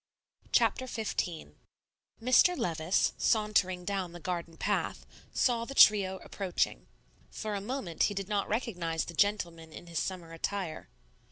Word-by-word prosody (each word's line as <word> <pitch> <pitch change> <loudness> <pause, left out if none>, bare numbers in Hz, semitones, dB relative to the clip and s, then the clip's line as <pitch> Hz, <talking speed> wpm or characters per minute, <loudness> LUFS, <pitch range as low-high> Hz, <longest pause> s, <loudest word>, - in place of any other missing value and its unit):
Chapter 260 - +2
XV 200 -8 -3 0.7
Mr. 255 +9 +5
Levice, 170 - +1
sauntering 200 -5 +2
down 190 -3 -2
the 175 - -8
garden 170 -1 -4
path, - - -1 0.3
saw 235 -2 +2
the 275 +4 -7
trio 195 -5 +6
approaching. 190 -3 -2 0.4
For 215 -1 -4
a 200 - -2
moment 210 -7 -4
he 205 - -1
did 195 -1 -3
not 205 -1 -1
recognize 180 -8 -1
the 170 - -8
gentleman 170 -4 0
in 165 - -10
his 170 -1 -3
summer 175 -3 -4
attire. 165 - -4
190 Hz, 140 wpm, -31 LUFS, 170-215 Hz, 0.7 s, trio